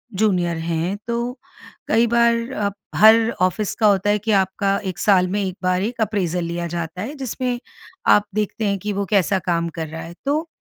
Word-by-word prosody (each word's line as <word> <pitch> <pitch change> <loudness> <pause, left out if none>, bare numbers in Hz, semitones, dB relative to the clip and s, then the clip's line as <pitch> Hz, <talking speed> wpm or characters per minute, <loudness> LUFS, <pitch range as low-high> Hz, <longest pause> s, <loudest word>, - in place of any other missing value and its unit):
Junior 180 -5 +1
हैं 165 +3 -2
तो 235 0 -1 0.7
कई 230 +2 +3
बार 235 +1 +2
अब 200 -1 0 0.2
हर 225 +1 +6
ऑफ़िस 185 +3 +1
का 215 - +3
होता 200 0 +3
है 210 - +3
कि 215 +2 -2
आपका 195 +1 0
1 185 -3 -4
साल 185 -2 +4
में 205 +3 -1
एक 185 -1 -4
बार 185 0 +1
एक 230 +1 -3
अप्रेजल 185 -5 0
लिया 170 0 -3
जाता 170 +1 -5
है, 240 +8 -4
जिसमें 250 -2 -3 0.5
आप 205 - +5
देखते 215 +1 -1
हैं 200 0 0
कि 205 +2 -3
वो 200 0 -1
कैसा 195 -1 +3
काम 170 -2 -1
कर 160 -2 -4
रहा 160 +1 -7
है। 170 +1 -9
तो 305 +4 0
200 Hz, 200 wpm, -21 LUFS, 180-220 Hz, 0.7 s, हर